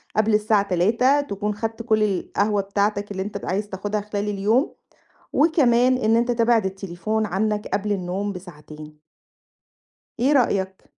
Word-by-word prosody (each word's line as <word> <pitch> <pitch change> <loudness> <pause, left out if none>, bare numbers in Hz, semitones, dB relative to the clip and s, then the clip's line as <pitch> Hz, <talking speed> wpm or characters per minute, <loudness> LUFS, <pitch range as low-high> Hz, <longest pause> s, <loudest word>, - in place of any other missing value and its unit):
قبل 215 0 +2
الساعة 210 -1 +3
15:00 230 +10 +3
تكون 210 -5 -3
خدت 225 +2 -4
كُلّ 220 -2 +2
القهوة 205 +1 0
بتاعتك 200 +1 -1
اللي 190 -1 -3
أنت 205 - -6
عايز 205 +3 -2
تاخدها 205 +2 -3
خلال 210 0 -3
اليوم، 210 - +1 0.6
وكمان 255 -5 +3
إن 225 -2 +2
أنت 235 +1 +1
تبعد 230 -3 +2
التليفون 195 +3 -3
عنّك 210 +2 -1
قبل 210 +1 -1
النوم 195 +1 -3
بساعتين. 155 -4 -11 1.2
إيه 270 +5 +3
رأيك؟ 190 -8 0
210 Hz, 135 wpm, -23 LUFS, 195-225 Hz, 1.2 s, الساعة